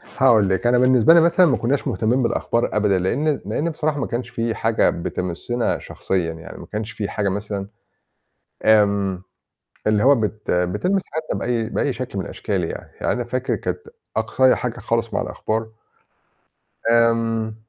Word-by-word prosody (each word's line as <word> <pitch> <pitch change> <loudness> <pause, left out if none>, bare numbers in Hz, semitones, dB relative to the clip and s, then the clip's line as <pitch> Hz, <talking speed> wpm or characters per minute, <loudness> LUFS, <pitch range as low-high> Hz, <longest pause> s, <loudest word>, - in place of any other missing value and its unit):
هاقول 115 -7 +3
لِك. 95 +5 0
أنا 120 +1 +4
بالنسبة 125 +3 +5
لي 170 - +7
مثلًا 170 +2 +5
ما 135 -7 +3
كُناش 130 +5 -1
مهتمين 120 +3 +1
بالأخبار 115 -1 0
أبدًا، 105 -3 +3
لأن 140 +11 0
لأن 165 +3 -1
بصراحة 155 -2 -1
ما - - -1
كانش 120 +1 -4
في 115 -1 -2
حاجة 115 0 +2
بتمسنا 90 +8 -2
شخصيًا 90 -4 -2
يعني، 80 0 -10
ما - - -10
كانش 110 +2 -5
في 105 -5 -4
حاجة 100 -2 -1
مثلًا، 100 0 -4 1.0
آمم 100 -3 +3 0.6
اللي 105 -1 +3
هو 140 +2 +6
بت 110 -2 -3
بتلمس 105 - +1
حياتنا 160 +1 -3
بأي 115 -2 -1
بأي 140 - 0
شكل 125 -6 -5
من 95 - -3
الأشكال 100 -4 -3
يعني. 80 - -6
يعني - - +1
أنا 125 - -2
فاكر 125 +2 -2
كانت - - -3 0.4
أقصايا 130 +4 +3
حاجة - - -4
خالص - - -1
مع - - 0
الأخبار 110 +1 -3 1.2
آمم 115 -1 +2
115 Hz, 165 wpm, -21 LUFS, 100-130 Hz, 1.2 s, لي